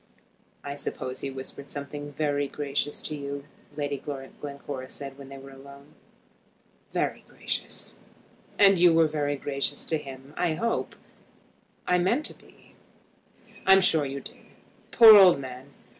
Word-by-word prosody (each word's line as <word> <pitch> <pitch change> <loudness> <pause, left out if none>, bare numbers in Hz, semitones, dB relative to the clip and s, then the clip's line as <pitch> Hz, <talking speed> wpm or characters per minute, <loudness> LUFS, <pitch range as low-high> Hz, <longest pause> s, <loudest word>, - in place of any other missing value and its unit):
"I 140 - -5
suppose 130 -2 -5
he 140 - -4
whispered 135 +1 -7
something 145 0 -7
very 145 -1 -1
gracious 145 +1 -3
to 155 - -4
you," 140 -1 -6 0.3
Lady 145 -1 -2
Glencora 140 -1 -7
said 140 -1 -7
when 140 -1 -12
they 135 - -9
were 135 0 -12
alone. 140 +2 -14 1.0
"Very - - -2
gracious." - - -4 0.6
"And 195 -2 +6
you 175 -2 +6
were 165 -1 +5
gracious 145 -1 -2
to 160 - -1
him, 135 0 -11
I 170 -3 0
hope." 230 +6 -2 0.9
"I 180 0 +2
meant 230 +12 +1
to - - -1
be." - - -22 0.9
"I'm 195 0 +8
sure 160 -5 +4
you 135 +1 -5
did. - - -8 0.5
Poor 225 -2 +10
old 185 -7 +8
man! 130 0 -9
145 Hz, 140 wpm, -27 LUFS, 140-155 Hz, 1.0 s, Poor